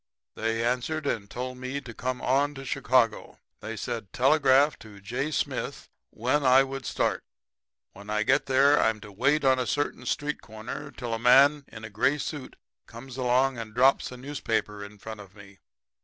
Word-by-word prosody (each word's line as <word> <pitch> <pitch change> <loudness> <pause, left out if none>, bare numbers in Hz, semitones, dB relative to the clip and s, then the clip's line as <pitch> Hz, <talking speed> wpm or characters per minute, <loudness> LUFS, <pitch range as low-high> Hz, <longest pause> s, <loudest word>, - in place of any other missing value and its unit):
They 115 +1 -1
answered 130 +6 -1
and 100 -7 -2
told 125 +2 -5
me 130 +2 -4
to 130 -4 -10
come 130 +2 -4
on 140 +3 +1
to 135 0 -8
Chicago. 130 -5 +1 0.2
They 115 0 -6
said 110 -2 -5
telegraph 140 +1 +4
to 105 -2 -13
J. 125 +9 -3
Smith 155 - -3 0.2
when 130 +6 0
I 130 +1 +6
would 135 -1 -6
start. - - -1 0.7
When 100 +1 -12
I 105 0 +1
get 125 - +2
there 135 +2 +4
I'm 110 -1 +1
to 105 - -11
wait 140 +8 +1
on 130 -1 +4
a 125 - -1
certain 145 -3 -2
street 150 +3 -2
corner 110 +6 -8
till 120 -5 -6
a 115 - -2
man 140 +4 +5
in 110 -1 -11
a 110 - -8
gray 120 +8 +2
suit 145 -2 -6 0.3
comes 120 +2 -10
along 130 0 +1
and 110 -1 -8
drops 130 +2 +3
a 125 - -8
newspaper 115 -6 -3
in 100 +1 -11
front 110 +1 -8
of 95 -2 -13
me. 100 -1 -15
125 Hz, 185 wpm, -27 LUFS, 110-135 Hz, 0.7 s, I